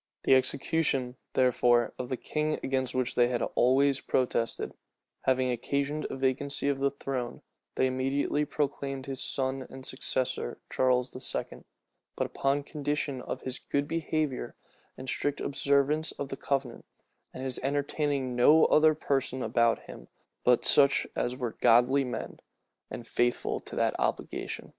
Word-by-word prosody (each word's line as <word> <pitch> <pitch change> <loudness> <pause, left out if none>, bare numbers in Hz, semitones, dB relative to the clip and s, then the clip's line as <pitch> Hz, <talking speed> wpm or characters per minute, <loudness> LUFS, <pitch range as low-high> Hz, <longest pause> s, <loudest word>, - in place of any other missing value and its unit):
The - - +4
execution, 130 -1 +1 0.2
therefore, 120 -2 +3
of 125 - -4
the 130 - -2
king, 155 +3 -2
against 130 -1 -1
which 130 -1 0
they 120 -1 +4
had 120 -1 -1
always 135 +2 +3
protested, 125 -3 -1 0.5
having 130 -1 +2
occasioned 140 +5 -2
a - - -4
vacancy 140 +2 0
of 140 -1 -1
the 140 0 +2
throne, 135 -3 -5 0.3
they 130 - +2
immediately 135 +3 0
proclaimed 140 -2 -3
his 135 -1 -5
son 130 -1 -2
and 130 0 -10
successor, 130 - -2
Charles 125 -1 +1
II.; 130 - -4 0.5
but - - -1
upon 140 +1 0
condition 145 -3 -3
"of - - -6
his 130 0 -5
good 140 0 -2
behavior, 155 -4 -2 0.4
and 130 - -8
strict 145 +2 -1
observance 140 +3 +1
of 140 - -5
the - - -4
covenant, 135 -3 -3 0.4
and 130 - -7
his 130 -1 -2
entertaining 140 -1 -1
no 150 +6 +6
other 155 0 +5
persons 135 -3 -1
about 115 -1 +2
him - - -11 0.4
but 125 -1 +3
such 140 -1 +6
as 125 - -1
were 120 -4 -4
godly 125 +4 +5
men, 125 - -5 0.5
and 120 - -7
faithful 120 0 0
to - - -9
that - - +1
obligation." - - -3
135 Hz, 145 wpm, -29 LUFS, 125-140 Hz, 0.5 s, no